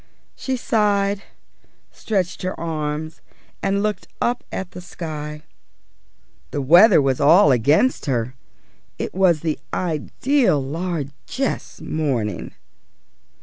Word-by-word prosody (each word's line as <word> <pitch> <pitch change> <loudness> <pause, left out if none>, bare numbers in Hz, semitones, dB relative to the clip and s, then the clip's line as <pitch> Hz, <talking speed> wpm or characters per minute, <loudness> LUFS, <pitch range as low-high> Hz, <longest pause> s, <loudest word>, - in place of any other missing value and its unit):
She 265 -1 -2
sighed, 205 -3 +1 0.7
stretched 190 -5 -2
her 185 0 -3
arms, 155 -1 -3 0.4
and 200 +1 0
looked 210 -1 -2
up 240 +1 0
at 190 -2 -5
the 180 - -9
sky. 150 -3 -6 1.1
The - - -3
weather 175 - +7
was 135 -2 +1
all 155 +2 +6
against 145 - +2
her. 125 -2 -1 0.6
It - - -4
was 180 -5 +3
the 160 -2 -2
ideal 185 - +1
largesse 160 - -4
morning. 130 -9 -2
165 Hz, 105 wpm, -21 LUFS, 150-200 Hz, 1.1 s, weather